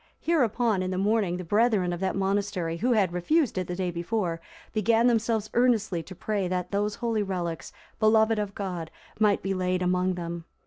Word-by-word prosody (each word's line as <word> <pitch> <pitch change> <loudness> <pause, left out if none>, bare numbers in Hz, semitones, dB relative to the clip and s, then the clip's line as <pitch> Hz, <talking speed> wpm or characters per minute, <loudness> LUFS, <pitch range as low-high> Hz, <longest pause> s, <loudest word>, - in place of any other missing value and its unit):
Hereupon, 240 - +1
in 185 - -2
the 185 - -2
morning, 200 -2 +1
the 180 - -5
brethren 205 -1 +2
of 175 - -4
that 190 0 -1
monastery 195 -3 -1
who 245 +8 +1
had 195 -6 +2
refused 270 - +1
it 180 - -3
the 180 - -3
day 180 -1 -2
before, 170 0 -2 0.3
began 225 +2 +3
themselves 225 -2 +1
earnestly 220 -8 +2
to 185 +3 -11
pray 200 0 -2
that 180 0 -2
those 205 +1 0
holy 230 -3 -1
relics, 175 -4 -3 0.3
beloved 220 0 +4
of 205 -1 -3
God, 180 -5 -4 0.3
might 210 -2 +3
be 195 - -1
laid 185 -1 0
among 180 0 +1
them. 170 -1 -5
195 Hz, 185 wpm, -27 LUFS, 180-220 Hz, 0.3 s, beloved